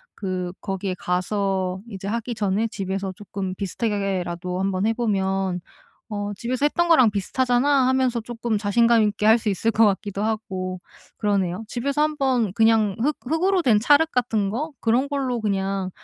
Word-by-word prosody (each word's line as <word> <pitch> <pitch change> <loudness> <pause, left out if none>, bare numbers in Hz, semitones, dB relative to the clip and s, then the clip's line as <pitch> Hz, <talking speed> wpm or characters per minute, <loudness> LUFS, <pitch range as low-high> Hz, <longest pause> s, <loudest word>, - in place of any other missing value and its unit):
그 185 -3 -3
거기에 195 -1 -3
가서 185 0 -1
이제 195 -2 -7
하기 235 +2 -2
전에 210 +2 0
집에서 195 -2 -3
쪼끔 190 -1 -5
비슷하게 205 +3 -2
하게라도 180 -2 -2
한번 190 +1 0
해 225 - +2
보면 195 -5 0 0.5
'어 205 -1 -3
집에서 250 +5 -2
했던 345 +3 +1
거랑 260 -10 +6
비슷하잖아.' 255 +6 +2
하면서 260 -2 +1
쪼끔 230 -1 -3
자신감 230 +3 +3
있게 210 0 0
할 220 +2 +7
수 220 - -3
있을 215 +3 +1
것 225 +1 +4
같기도 200 0 -1
하고 185 -4 -3 0.4
그러네요. 200 -1 0
집에서 280 +4 -1
한번 265 -9 +1
그냥 220 -2 +3
흙 295 +3 +1
흙으로 355 +6 +1
된 225 -7 +4
찰흙 295 +6 +4
같은 220 -5 0
거 295 +8 -3
그런 245 +5 +2
걸로 265 -4 -1
그냥 195 -2 -1
210 Hz, 335 characters per minute, -23 LUFS, 195-245 Hz, 0.5 s, 할